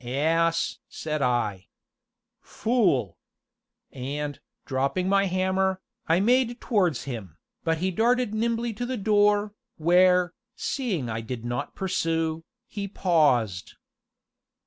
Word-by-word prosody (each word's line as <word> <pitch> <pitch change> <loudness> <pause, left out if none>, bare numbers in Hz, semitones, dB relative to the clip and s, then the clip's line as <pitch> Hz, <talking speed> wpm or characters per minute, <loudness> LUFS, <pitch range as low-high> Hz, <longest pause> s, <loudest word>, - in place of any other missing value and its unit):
"Ass!" 165 +6 +1
said 155 -1 -3
I. 120 -7 0 0.7
"Fool!" 195 - 0 0.7
And, 145 +3 -4 0.3
dropping 140 +7 0
my 195 +1 +3
hammer, 190 +1 +1 0.3
I 165 +2 +3
made 240 +3 +2
towards 185 - +1
him, 105 - -7 0.3
but 165 -1 +1
he 185 +3 -1
darted 235 +3 +2
nimbly 230 +1 0
to 245 +4 -4
the 255 0 -2
door, 205 0 +3 0.2
where, 180 +2 +4 0.2
seeing 210 - -2
I 115 0 -3
did 115 0 -6
not 120 0 -3
pursue, 165 -4 -1 0.2
he 200 -3 -5
paused. 140 - +1
175 Hz, 110 wpm, -26 LUFS, 135-205 Hz, 0.7 s, where